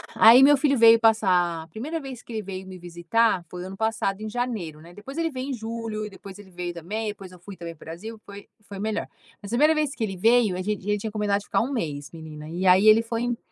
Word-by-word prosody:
Aí 235 +4 +8
meu 290 +1 +7
filho 280 0 +2
veio 230 0 +7
passar 185 -7 +2
A - - -16
1ª 275 - -5
vez 265 -5 -8
que 235 - -11
ele 220 - -2
veio 190 -1 -7
me 185 -1 -9
visitar 175 +4 0
foi 180 0 -7
ano 190 +1 -8
passado, 220 -2 -1
em 215 - -4
janeiro, 215 -10 -4
né? 170 +2 -14
Depois 215 - -10
ele 330 -1 0
veio 260 0 -5
em - - -2
julho 225 -2 -5
e - - -7
depois 195 -1 -12
ele 195 -2 -14
veio 175 0 -5
também. 205 +7 -4
Depois 195 -3 -9
eu 180 - -15
fui 195 +3 -11
também 170 -1 -7
pro - - -16
Brasil. 215 +8 -8
Foi 200 0 -11 0.2
foi 200 -1 -9
melhor. 215 +1 -2 0.3
Mas 200 - -9
a - - 0
1ª 305 +4 +5
vez 300 -2 -1
que 235 - -3
ele 195 -3 -3
veio, 225 0 +3
a - - -3
gente 210 +2 -2
a - - +1
gente 210 -1 -1
tinha 220 - -4
combinado 205 -1 0
de 205 - -14
ficar - - +1
1 250 +4 -2
mês, 150 - -4
menina, 155 -2 -10
e 175 +3 -3
aí 185 +3 +6
ele 215 +1 +7
foi 230 0 -3
em 245 -1 -1
210 Hz, 270 wpm, -25 LUFS, 180-230 Hz, 0.3 s, Aí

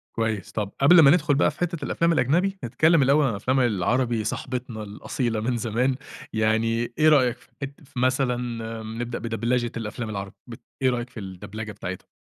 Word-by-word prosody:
كويس، 110 -2 -2
طب 105 -2 -3
قبل 165 +6 +8
ما 140 -3 +8
ندخل 150 -4 +3
بقى 145 - +3
في - - -19
حتة 175 -2 -2
الأفلام 170 0 +1
الأجنبي 175 +8 +1
نتكلم 155 +7 +3
الأول 140 +3 +4
عن - - +2
الأفلام 130 +6 0
العربي 120 +1 +1
صاحبتنا 120 0 -4
الأصيلة 110 +2 -3
من 120 +2 -1
زمان، 120 +4 0 0.4
يعني 115 +2 +1
إيه 155 +1 +5
رأيك 130 -5 +4
في - - -23
حت 140 0 -4
في 130 - -7
مثلًا 130 -1 +2 0.5
م 110 +2 -6
نبدأ 120 0 -4
بدبلچة 115 +1 -1
الأفلام 110 +1 -5
العربي 100 -2 -5
بت 115 -2 -9 0.2
إيه 130 - +4
رأيك 120 0 -2
في 120 - -9
الدبلجة 100 +3 -7
بتاعتها؟ 95 -3 -7
120 Hz, 180 wpm, -25 LUFS, 110-135 Hz, 0.5 s, قبل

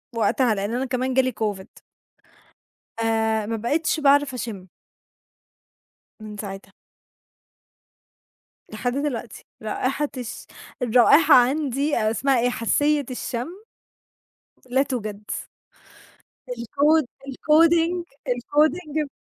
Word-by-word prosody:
فوقتها، 230 0 +2
لأن 200 +3 -3
أنا 255 +2 -1
كمان 255 0 -1
جه 265 - +5
لي 255 0 -1
COVID. 200 -3 -5 1.2
آآ، 220 -1 +1
ما 225 - -1
بقتش 305 +9 0
باعرف 285 -1 +4
أشم. 215 -7 -6 1.5
من 215 -1 -9
ساعتها. 195 -2 -8 2.0
لحد 245 +3 -3
دلوقتي 250 -6 -4 0.2
رائحة 260 +7 -2
الش 245 -3 -7 0.4
الرائحة 250 +6 +5
عَندي، 275 +2 +2
آآ 215 -1 +1
اسمها 260 +3 +1
إيه؟ 245 +1 +2
حاسّية 290 +5 +1
الشم 245 0 -4 1.2
لا 265 +2 +3
توجد. 215 -6 -5 1.2
الcod 285 +6 +2 0.2
الcoding 330 +5 +3 0.3
الcoding 300 +5 0
250 Hz, 95 wpm, -23 LUFS, 225-290 Hz, 2.0 s, جه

